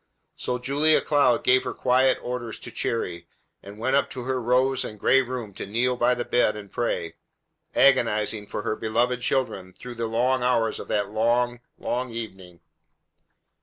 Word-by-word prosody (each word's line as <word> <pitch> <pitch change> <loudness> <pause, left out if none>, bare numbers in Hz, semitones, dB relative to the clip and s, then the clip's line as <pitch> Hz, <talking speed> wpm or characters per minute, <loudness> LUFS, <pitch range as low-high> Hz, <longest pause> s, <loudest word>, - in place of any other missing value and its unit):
So 125 - -2
Julia 145 +5 +3
Cloud 140 -5 +2
gave 130 +1 +4
her - - -4
quiet 130 +1 +3
orders 120 -3 -4
to - - -8
Cherry, 85 -7 -3 0.3
and 100 +1 -11
went 130 +5 0
up 140 - +2
to 125 - -6
her 130 0 -2
rose 130 +2 +2
and 105 - -8
gray 135 - +4
room 125 -5 -5
to - - -7
kneel 120 +5 +1
by 125 +1 +2
the 120 - -3
bed 120 -3 +2
and 105 -2 -9
pray, 85 -8 -2 0.6
agonizing 110 -5 +3
for 105 - -5
her - - -1
beloved 120 +3 0
children 100 -8 -1
through 125 +5 -9
the 115 -1 -3
long 125 +3 +1
hours 120 -3 +1
of - - -8
that 100 -1 0
long, 120 +2 +1 0.2
long 125 +1 -2
evening. 95 -7 -8
120 Hz, 170 wpm, -25 LUFS, 110-125 Hz, 0.6 s, gave